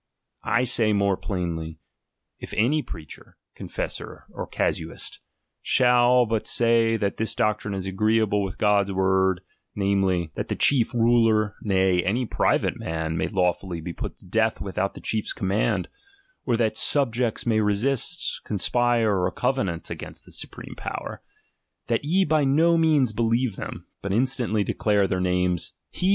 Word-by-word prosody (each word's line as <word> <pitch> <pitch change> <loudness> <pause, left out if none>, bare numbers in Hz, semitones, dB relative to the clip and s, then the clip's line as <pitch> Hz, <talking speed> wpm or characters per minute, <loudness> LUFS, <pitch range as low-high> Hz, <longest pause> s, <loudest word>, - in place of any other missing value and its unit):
I 120 - +2
say 115 -3 +2
more 100 -1 +2
plainly, 85 -5 -4 0.6
if - - -8
any 140 +8 +2
preacher, 80 - -11 0.2
confessor, - - -6
or - - -6
casuist, - - -3 0.4
shall 125 0 +4
but 110 -1 -2
say 115 -1 +3
that 100 -2 -2
this 110 - -1
doctrine 105 -1 0
is 95 -1 -4
agreeable 105 +2 +1
with 95 -2 -4
God's 100 -1 +2
word, 95 -1 +2 0.3
namely, 100 -1 +1
XXU 100 - +2
THE 95 -2 +2
PREFACE 85 -3 -5
that - - -3
the - - -2
chief 130 -5 +3
ruler, 115 -3 +3
uay, 95 -3 +2
any 120 +6 0
private - - 0
man 80 0 -3
may 80 - 0
law 90 -3 +2
fully 90 -2 -7
be 85 +2 -6
put - - -6
to - - -16
death 110 +4 +1
without 100 0 -2
the - - -10
chief's 110 -1 -2
command, 100 0 0 0.6
or 120 -2 +2
that 110 -2 0
subjects 120 -5 +1
may 110 -2 +2
resist, 115 - 0
conspire, 115 -1 +1
or 90 - +2
covenant 105 -10 -2
against - - -8
the - - -14
supreme - - -5
power; - - -6 0.6
that 115 +2 0
ye 185 +6 +2
by 155 -1 +2
no 160 +5 +4
means 155 -8 +3
believe 115 0 0
them, - - -7 0.2
but 100 - -3
instantly 120 -2 +1
declare 100 -1 +1
thetr 90 0 -1
names. 90 -1 0
105 Hz, 155 wpm, -24 LUFS, 95-120 Hz, 0.6 s, shall